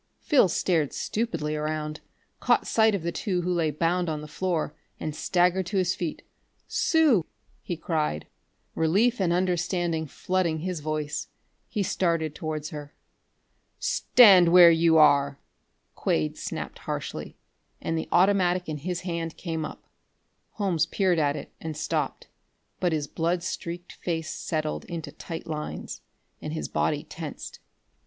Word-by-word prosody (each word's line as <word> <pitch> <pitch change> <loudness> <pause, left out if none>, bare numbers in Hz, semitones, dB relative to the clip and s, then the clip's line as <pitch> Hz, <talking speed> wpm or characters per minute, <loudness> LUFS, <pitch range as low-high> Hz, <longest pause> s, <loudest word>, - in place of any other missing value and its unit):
Phil 285 - +4
stared 165 -4 +1
stupidly 205 -9 -2
around, 155 0 -3 0.4
caught 245 -1 +2
sight 220 -2 +3
of 185 - -4
the 170 - -1
two 180 -3 -1
who 180 +1 0
lay 165 -3 +1
bound 170 +3 0
on 155 -1 -3
the 150 - -8
floor, 170 +1 -2 0.3
and 155 -1 -4
staggered 180 +1 +2
to 200 - -2
his 180 -1 +2
feet. 175 -3 -4 0.4
"Sue!" 310 - +3 0.4
he 175 - -4
cried, 155 - -1 0.5
relief 200 +9 +2
and 175 -3 +2
understanding 175 -2 0
flooding 170 0 -1
his 180 -1 -3
voice. 150 0 -3 0.4
He 210 -3 -1
started 165 -5 0
towards 155 -1 -4
her. 145 -1 -8 0.8
"Stand 220 - +6
where 175 -1 +9
you 165 0 +4
are!" 140 -2 +5 0.6
Quade 75 -1 0
snapped - - -5
harshly, - - -5 0.4
and 165 - -2
the 160 - -3
automatic 180 -1 +3
in 155 -2 -4
his 180 +4 -3
hand 165 -2 -4
came 165 -3 -3
up. - - -7 0.7
Holmes 190 -7 +1
peered 185 -4 +1
at 145 -1 +2
it - - -8
and 160 -2 -5
stopped, 155 -2 -2 0.5
but 180 - +1
his 155 -2 0
blood 170 +4 -1
streaked 175 0 -5
face 160 -2 -3
settled 155 -1 -3
into 170 -3 -6
tight 165 -1 -7
lines, 155 -2 -5 0.4
and 150 - -5
his 160 - -3
body 150 -1 0
tensed. 160 -3 -8
170 Hz, 145 wpm, -26 LUFS, 155-180 Hz, 0.8 s, where